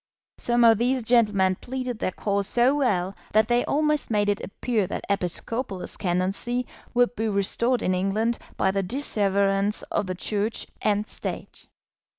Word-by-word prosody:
Some 240 Hz, 0 st, +2 dB
of 225 Hz, -2 st, +6 dB
these 250 Hz, +1 st, +1 dB
gentlemen 210 Hz, -6 st, +3 dB
pleaded 255 Hz, -2 st, -4 dB
their -, -, 0 dB
cause 200 Hz, +1 st, 0 dB
so 245 Hz, +4 st, +3 dB
well 195 Hz, -9 st, 0 dB, 0.2 s
that 215 Hz, 0 st, +4 dB
they 240 Hz, 0 st, +2 dB
almost 300 Hz, 0 st, +1 dB
made 205 Hz, -2 st, +1 dB
it 205 Hz, -, -1 dB
appear 215 Hz, 0 st, -1 dB
that -, -, -5 dB
episcopal 200 Hz, +3 st, -2 dB
ascendancy 195 Hz, +7 st, -1 dB, 0.3 s
would 245 Hz, 0 st, +3 dB
be 220 Hz, 0 st, -1 dB
restored 235 Hz, +5 st, +1 dB
in 185 Hz, -, +1 dB
England 210 Hz, +5 st, 0 dB, 0.2 s
by 190 Hz, -, +2 dB
the 195 Hz, 0 st, 0 dB
disseverance 200 Hz, -3 st, +1 dB
of 205 Hz, -, 0 dB
the 185 Hz, -, -3 dB
Church 210 Hz, +4 st, -2 dB, 0.2 s
and 210 Hz, 0 st, +1 dB
State. -, -, -6 dB
210 Hz, 155 wpm, -25 LUFS, 195-240 Hz, 0.3 s, of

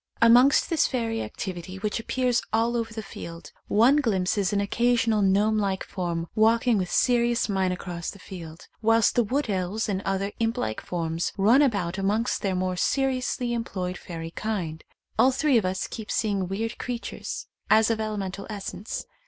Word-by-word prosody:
Amongst 245 Hz, +4 st, +6 dB
this 325 Hz, -, +3 dB
fairy 230 Hz, -3 st, -2 dB
activity 185 Hz, -1 st, -6 dB
which 210 Hz, +3 st, -2 dB
appears 245 Hz, +1 st, 0 dB
all 230 Hz, +2 st, +1 dB
over 230 Hz, -1 st, -2 dB
the 220 Hz, 0 st, -6 dB
field, 170 Hz, -3 st, -9 dB, 0.2 s
one 235 Hz, +7 st, +5 dB
glimpses 200 Hz, -6 st, +1 dB
an 205 Hz, -, +1 dB
occasional 225 Hz, +1 st, +2 dB
gnome 205 Hz, +3 st, +3 dB
like 195 Hz, -2 st, -1 dB
form 170 Hz, -2 st, -3 dB
walking 225 Hz, +1 st, +3 dB
with 180 Hz, -1 st, -2 dB
serious 240 Hz, -1 st, +2 dB
mien 190 Hz, -3 st, +1 dB
across 175 Hz, -2 st, -5 dB
the -, -, -9 dB
field, 170 Hz, -4 st, -10 dB, 0.2 s
whilst 225 Hz, 0 st, +4 dB
the 240 Hz, -, +3 dB
wood 270 Hz, +6 st, -1 dB
elves 195 Hz, +2 st, -1 dB
and 195 Hz, -2 st, -1 dB
other 195 Hz, 0 st, -1 dB
imp 230 Hz, +1 st, 0 dB
like 110 Hz, -, -2 dB
forms 165 Hz, -1 st, -2 dB
run 225 Hz, +8 st, +5 dB
about 200 Hz, -9 st, +1 dB
amongst 210 Hz, +5 st, 0 dB
their 195 Hz, -2 st, 0 dB
more 185 Hz, 0 st, -1 dB
seriously 255 Hz, 0 st, 0 dB
employed 185 Hz, -6 st, -3 dB
fairy 165 Hz, -2 st, -7 dB
kind. 170 Hz, -7 st, -3 dB, 0.4 s
All 260 Hz, -, +6 dB
three 265 Hz, -2 st, +3 dB
of 205 Hz, -, -3 dB
us 185 Hz, 0 st, -1 dB
keep 220 Hz, -2 st, -7 dB
seeing 200 Hz, -4 st, 0 dB
weird 225 Hz, +5 st, -3 dB
creatures 245 Hz, -2 st, -5 dB, 0.2 s
as 220 Hz, +1 st, +5 dB
of 225 Hz, -, -1 dB
elemental 200 Hz, -3 st, -4 dB
essence. 200 Hz, -1 st, -5 dB
210 Hz, 170 wpm, -26 LUFS, 185-230 Hz, 0.4 s, Amongst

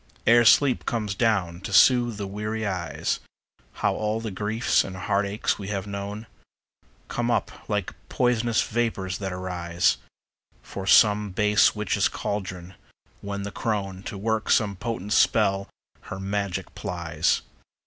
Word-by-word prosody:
Ere 120 Hz, 0 st, +6 dB
sleep 130 Hz, +3 st, +4 dB
comes 105 Hz, -4 st, -1 dB
down 95 Hz, -6 st, 0 dB
to 100 Hz, -, -6 dB
soothe 120 Hz, +1 st, +5 dB
the 100 Hz, -, -4 dB
weary 105 Hz, +3 st, -3 dB
eyes, 85 Hz, -5 st, -2 dB, 0.7 s
How -, -, +3 dB
all 110 Hz, +1 st, -1 dB
the 115 Hz, -2 st, -5 dB
griefs 105 Hz, +5 st, +1 dB
and 95 Hz, -, -7 dB
heartaches 100 Hz, +2 st, -1 dB
we 100 Hz, -, -6 dB
have 100 Hz, -1 st, -3 dB
known 100 Hz, +2 st, -5 dB, 0.8 s
Come 120 Hz, 0 st, -2 dB
up 120 Hz, -, -2 dB
like 105 Hz, -3 st, -1 dB, 0.2 s
pois'nous 120 Hz, -2 st, +1 dB
vapors 105 Hz, -5 st, -1 dB
that 95 Hz, -2 st, -3 dB
arise 90 Hz, -1 st, 0 dB, 0.7 s
From 95 Hz, -1 st, -7 dB
some 105 Hz, 0 st, +5 dB
base 105 Hz, +3 st, +3 dB
witch's 105 Hz, -2 st, +1 dB
caldron, 95 Hz, -3 st, -5 dB, 0.5 s
when 100 Hz, 0 st, -4 dB
the 100 Hz, -, -5 dB
crone, 100 Hz, -4 st, -3 dB
To 100 Hz, -, -7 dB
work 110 Hz, +2 st, -1 dB
some 100 Hz, -3 st, +3 dB
potent 105 Hz, 0 st, -3 dB
spell, 100 Hz, -2 st, +3 dB, 0.4 s
her 95 Hz, -, -5 dB
magic 95 Hz, -1 st, -3 dB
plies. 85 Hz, -4 st, -1 dB
100 Hz, 140 wpm, -25 LUFS, 95-110 Hz, 0.8 s, Ere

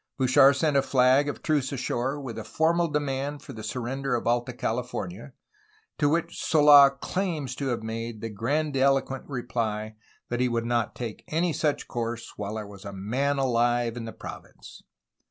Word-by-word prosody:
Bouchard 135 Hz, +1 st, +6 dB
sent 150 Hz, +1 st, +1 dB
a 140 Hz, -, +5 dB
flag 130 Hz, +2 st, +3 dB
of -, -, -6 dB
truce 150 Hz, -4 st, +1 dB
ashore 130 Hz, +1 st, -2 dB
with 130 Hz, -5 st, -6 dB
a -, -, -5 dB
formal 170 Hz, +2 st, +1 dB
demand 145 Hz, -1 st, -2 dB
for -, -, -9 dB
the 110 Hz, -, -8 dB
surrender 125 Hz, +4 st, -2 dB
of 120 Hz, -, -3 dB
Alta 120 Hz, +1 st, +1 dB
California, 120 Hz, -1 st, -4 dB, 0.7 s
to 145 Hz, -, +3 dB
which 170 Hz, +2 st, -1 dB
Sola 145 Hz, -3 st, +8 dB
claims 150 Hz, -1 st, -3 dB
to 140 Hz, -, -2 dB
have 120 Hz, -3 st, -2 dB
made 115 Hz, 0 st, -5 dB
the 115 Hz, -, -5 dB
gran 140 Hz, +9 st, -1 dB
diloquent 135 Hz, 0 st, +1 dB
reply 115 Hz, -4 st, -3 dB, 0.3 s
that 120 Hz, -, -2 dB
he 125 Hz, 0 st, +2 dB
would 115 Hz, -1 st, -1 dB
not 120 Hz, -2 st, 0 dB
take 115 Hz, -3 st, -6 dB
any 165 Hz, +2 st, 0 dB
such 150 Hz, -2 st, -1 dB
course 115 Hz, -1 st, -4 dB
^Vhile 105 Hz, +1 st, -4 dB
there 110 Hz, -1 st, -4 dB
was 100 Hz, -1 st, -12 dB
a 100 Hz, -, -6 dB
man 125 Hz, +9 st, -1 dB
alive 120 Hz, -2 st, +1 dB
in 120 Hz, -2 st, -5 dB
the 115 Hz, -, -6 dB
province. -, -, -11 dB
125 Hz, 175 wpm, -27 LUFS, 115-145 Hz, 0.7 s, Sola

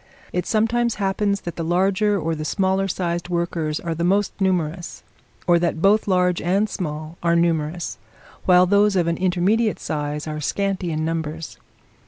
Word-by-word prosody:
It 180 Hz, -, -1 dB
sometimes 230 Hz, +1 st, +1 dB
happens 200 Hz, 0 st, 0 dB
that 170 Hz, -1 st, -6 dB
the 165 Hz, -, -2 dB
larger 195 Hz, +4 st, +2 dB
or 165 Hz, 0 st, -1 dB
the 155 Hz, -1 st, -4 dB
smaller 190 Hz, +3 st, +1 dB
sized 175 Hz, -1 st, -2 dB
workers 170 Hz, -3 st, -1 dB
are 170 Hz, -1 st, -3 dB
the 165 Hz, +1 st, -3 dB
most 195 Hz, +3 st, +2 dB
numerous; 175 Hz, -2 st, -1 dB, 0.4 s
or 175 Hz, -1 st, +4 dB
that 170 Hz, -1 st, 0 dB
both 205 Hz, +5 st, +3 dB
large 180 Hz, -2 st, +2 dB
and 195 Hz, +5 st, +1 dB
small 155 Hz, -4 st, -5 dB
are 170 Hz, 0 st, +2 dB
numerous, 165 Hz, -6 st, 0 dB, 0.5 s
while 180 Hz, 0 st, +6 dB
those 205 Hz, +2 st, +3 dB
of 175 Hz, -2 st, +2 dB
an 170 Hz, 0 st, 0 dB
intermediate 190 Hz, +5 st, +1 dB
size 150 Hz, 0 st, -3 dB
are 155 Hz, -1 st, -4 dB
scanty 190 Hz, +1 st, -1 dB
in 155 Hz, 0 st, -1 dB
numbers. 160 Hz, -1 st, -4 dB
175 Hz, 165 wpm, -22 LUFS, 165-195 Hz, 0.5 s, while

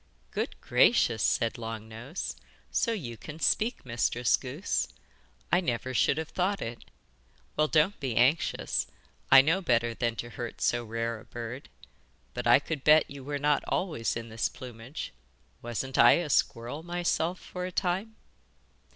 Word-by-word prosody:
'Good -, -, -3 dB
gracious!' 110 Hz, -2 st, +4 dB
said 115 Hz, +2 st, +1 dB
Long 115 Hz, -1 st, -6 dB
Nose. 120 Hz, +9 st, -6 dB, 0.4 s
'So 230 Hz, -, +1 dB
you 130 Hz, -, -4 dB
can 155 Hz, +6 st, -9 dB
speak, 225 Hz, -, +1 dB
Mistress 120 Hz, 0 st, +2 dB
Goose. -, -, -2 dB, 0.6 s
I 175 Hz, +2 st, +4 dB
never 130 Hz, -4 st, -2 dB
should 135 Hz, -, +3 dB
have 160 Hz, 0 st, -3 dB
thought 190 Hz, +2 st, 0 dB
it! 115 Hz, +1 st, -6 dB, 0.7 s
Well, 155 Hz, 0 st, +3 dB
don't 160 Hz, +6 st, +2 dB
be 130 Hz, -5 st, -2 dB
anxious. 130 Hz, +7 st, +2 dB, 0.4 s
I 135 Hz, 0 st, +10 dB
know 165 Hz, +6 st, +2 dB
better 120 Hz, -7 st, +2 dB
than 115 Hz, 0 st, -1 dB
to 120 Hz, +1 st, -6 dB
hurt 120 Hz, 0 st, -6 dB
so 120 Hz, 0 st, +1 dB
rare 115 Hz, 0 st, -3 dB
a -, -, -15 dB
bird. 120 Hz, +3 st, -7 dB, 0.6 s
But -, -, -3 dB
I -, -, +8 dB
could 155 Hz, -5 st, -4 dB
bet 155 Hz, -1 st, +5 dB
you 140 Hz, -1 st, -8 dB
were 145 Hz, +1 st, -3 dB
not 145 Hz, +1 st, +2 dB
always 155 Hz, -11 st, -1 dB
in 115 Hz, 0 st, -7 dB
this 110 Hz, +1 st, -1 dB
plumage 125 Hz, -, -8 dB, 0.5 s
wasn't 120 Hz, +3 st, -3 dB
I 120 Hz, -, +9 dB
a 165 Hz, -4 st, 0 dB
squirrel 120 Hz, +5 st, 0 dB
myself 175 Hz, 0 st, -1 dB
for 180 Hz, 0 st, -5 dB
a -, -, -6 dB
time? 190 Hz, +5 st, -1 dB
130 Hz, 160 wpm, -29 LUFS, 115-165 Hz, 0.7 s, I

